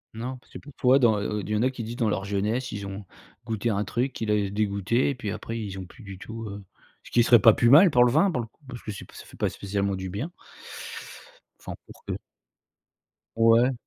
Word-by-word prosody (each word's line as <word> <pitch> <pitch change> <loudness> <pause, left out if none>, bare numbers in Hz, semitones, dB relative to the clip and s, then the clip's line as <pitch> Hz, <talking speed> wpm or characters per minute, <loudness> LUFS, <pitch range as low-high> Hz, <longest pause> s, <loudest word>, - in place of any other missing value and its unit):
Non 125 +3 -5
parce 125 - -24
que - - -7
parfois 135 -2 +2
dans, 110 -4 +4
heu 105 +1 -2
heu, - - -3
il 105 - -8
y 105 - +1
en 105 - +1
a 130 - +2
qui 125 -3 -6
disent 115 +2 -6
dans 120 -3 0
leur 95 - -1
jeunesse, 105 +6 -1
ils 100 -1 -5
ont 100 +1 -6 0.4
goûté 115 0 -1
un 100 0 0
truc 125 +6 -1
qui 110 - -4
l'a 105 - +3
dé 100 -2 0
dégoûté 105 +4 +1
et 140 - -2
puis 105 -5 -4
après 115 +1 -5
ils 100 -3 -5
ont 95 - -6
plus 120 +5 -15
du 95 -2 -9
tout, 115 +2 -7
heu 100 0 -8 0.4
ce - - -12
qui 120 - +5
serait 120 -1 +7
pas 110 +1 +7
plus 120 - +3
mal 170 +7 +9
pour 125 -5 +5
le 120 - +3
vin 165 +8 +4
pour 130 - -1
le 115 - -7
coup 115 - -38
parce 125 -2 -8
que 105 - -5
c'est 100 - -8
p - - -19
ça - - -10
fait - - -15
pas - - +1
spécialement 100 0 -2
du 95 0 -5
bien. 120 - -4 1.3
Enfin, - - -7
pour - - -15
que - - -3 1.2
Ouais. 115 +3 +5
115 Hz, 260 wpm, -26 LUFS, 100-125 Hz, 1.3 s, mal